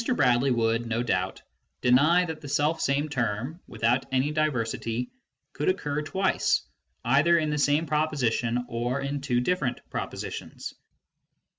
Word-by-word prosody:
Bradley 125 - +3
would, 115 -1 +1
no 115 +1 0
doubt, 95 -5 -1 0.4
deny 150 +9 +5
that 160 -2 -6
the 145 - -8
self 150 +3 +1
same 140 +2 +1
term, 130 +2 -2
without 115 +3 0
any 135 +3 +1
diversity, 125 -5 -1 0.4
could - - 0
occur 150 - -1
twice, 190 +5 +1 0.4
either 145 +8 +4
in 155 -2 0
the 150 - -1
same 145 +3 +3
proposition 125 -6 0
or 120 +3 -2
in 140 +1 -3
two 125 -3 +1
different 135 -4 0
propositions. - - -5
135 Hz, 135 wpm, -27 LUFS, 120-150 Hz, 0.4 s, deny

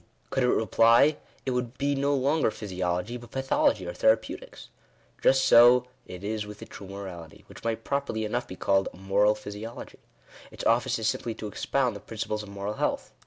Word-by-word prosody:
Could 135 - 0
it 125 - +3
reply 115 +6 +4 0.3
it 130 - 0
would 125 0 -3
be 140 0 +1
no 140 +1 +1
longer 140 +1 +2
Physiology, 95 +2 -3
but 120 -1 -13
Pathology, 135 - +1
or - - -4
Therapeutics. - - 0 0.5
Just 135 0 +4
so 120 0 +7 0.2
it 90 +1 -9
is 105 +1 -2
with 105 0 -10
a - - -8
true 100 - -11
fborality, 95 -5 -9
which - - -14
might 115 -1 -2
properly 140 -6 -2
enough 120 +3 -2
be 95 - -8
called 95 +1 +1
— - - -24
Moral 100 +3 +2
Physiology. 105 +2 -8 0.5
Its - - -9
office 120 +2 +2
is 110 -1 -1
simply 115 +1 -2
to - - -7
expound 125 +3 -1
the - - -7
principles 105 0 -4
of 105 - -10
moral 100 +1 -4
health. - - -2
115 Hz, 185 wpm, -27 LUFS, 105-130 Hz, 0.5 s, so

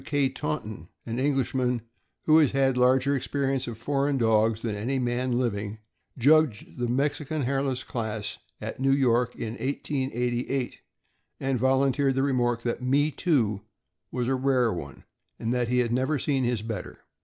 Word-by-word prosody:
W. - - -11
K. 140 -3 +1
Taunton, 110 - -4 0.2
an 115 +1 -3
Englishman 130 -3 0 0.4
who 155 0 +6
has 150 -5 +3
had 135 -1 +2
larger 130 +2 +3
experience 135 -1 -1
of 115 -2 -5
foreign 140 +3 0
dogs 110 -1 +2
than 115 -3 -1
any 120 +7 -1
man 125 0 0
living, 105 -4 -2 0.4
judged 140 -4 +3
the 120 - 0
Mexican 145 +3 -1
Hairless 135 0 -1
class 110 -3 -4 0.2
at - - -6
New 135 0 +3
York 125 -3 +2
in 110 - -4
1888, 130 -2 -2 0.6
and 135 -2 0
vol 130 +2 +3
unteered 135 0 +2
the 135 - +2
remark 120 -4 +1
that 120 0 -2
Me 140 +4 +2
Too 125 - +1 0.5
was 125 -1 -2
a 135 - +2
rare 130 -3 +2
one, 70 -5 -8 0.3
and 115 +1 -2
that 125 -1 0
he 125 +1 +1
had 120 -2 +2
never 130 +5 +1
seen 135 -1 0
his 120 -3 -1
better. 110 -1 -6
130 Hz, 165 wpm, -27 LUFS, 120-135 Hz, 0.6 s, who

